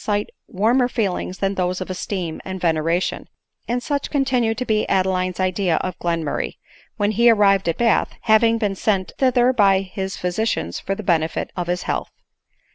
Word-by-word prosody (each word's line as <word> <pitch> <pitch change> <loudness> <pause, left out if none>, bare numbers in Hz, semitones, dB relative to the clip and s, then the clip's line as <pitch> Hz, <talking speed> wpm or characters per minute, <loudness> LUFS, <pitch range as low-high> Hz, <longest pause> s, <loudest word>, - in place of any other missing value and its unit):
cite 205 -1 -1 0.2
warmer 235 +6 +2
feelings 195 -6 -2
than 195 0 0
those 180 -1 -1
of 185 - -5
esteem 180 -3 -4
and 190 0 -5
veneration: 165 +1 0 0.4
and 245 +1 -1
such 285 +1 -2
continued 250 -5 +1
to 250 - -2
be 215 -2 0
Adeline's 185 -1 0
idea 185 -2 +1
of 185 +1 -2
Glenmur 170 -3 -1
ray, - - -4 0.4
when 205 0 +1
he 235 +3 +4
arrived 195 -4 +4
at 165 - -1
Bath, 235 -2 +2
having 225 +1 +4
been 210 -3 0
sent 195 -1 -1
thither 255 -1 +3
by. 195 -4 +3
bis 190 -1 -3
physicians 180 - -2
for 195 - -3
the 215 - -7
benefit 165 -3 0
of 175 -2 -3
his 180 0 -1
health. - - -2
195 Hz, 175 wpm, -21 LUFS, 180-225 Hz, 0.4 s, he